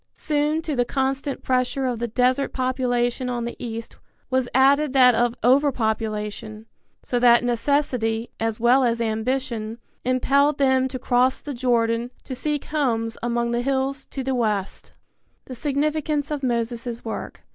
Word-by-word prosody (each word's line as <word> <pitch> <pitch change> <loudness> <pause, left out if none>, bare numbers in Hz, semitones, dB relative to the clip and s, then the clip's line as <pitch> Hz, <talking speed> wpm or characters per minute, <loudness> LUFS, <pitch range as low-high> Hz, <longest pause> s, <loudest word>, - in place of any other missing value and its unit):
Soon 300 +1 0
to 305 -3 -2
the 245 - +2
constant 270 +2 -2
pressure 255 +1 0
of 245 -3 -1
the 235 - -1
desert 250 +4 +1
population 250 -1 0
on 240 -1 -2
the 235 - -5
east 230 -1 -6 0.3
was 260 -1 +1
added 275 +2 +4
that 250 -2 +6
of 240 +1 +1
over 275 +4 +4
population, 215 -2 -3 0.4
so 245 - -1
that 240 0 +6
necessity, 240 -2 0
as 225 0 -1
well 245 +3 +4
as 235 -1 +1
ambition, 225 0 -2 0.3
impelled 275 +3 +2
them 265 -1 +3
to 260 - -5
cross 250 0 +2
the 290 - -6
Jordan 235 -1 +1
to 265 - -6
seek 295 +3 -2
homes 230 -7 -1
among 235 0 -1
the 240 0 0
hills 270 +1 -1
to 270 - -5
the 265 +1 -1
west. 210 -6 -1
V. - - -35
THE 255 - -6
SIGNIFICANCE 295 +2 -1
OF 295 -2 -2
MOSES' 235 -1 -2
WORK. 225 - -6
250 Hz, 155 wpm, -23 LUFS, 235-270 Hz, 0.4 s, that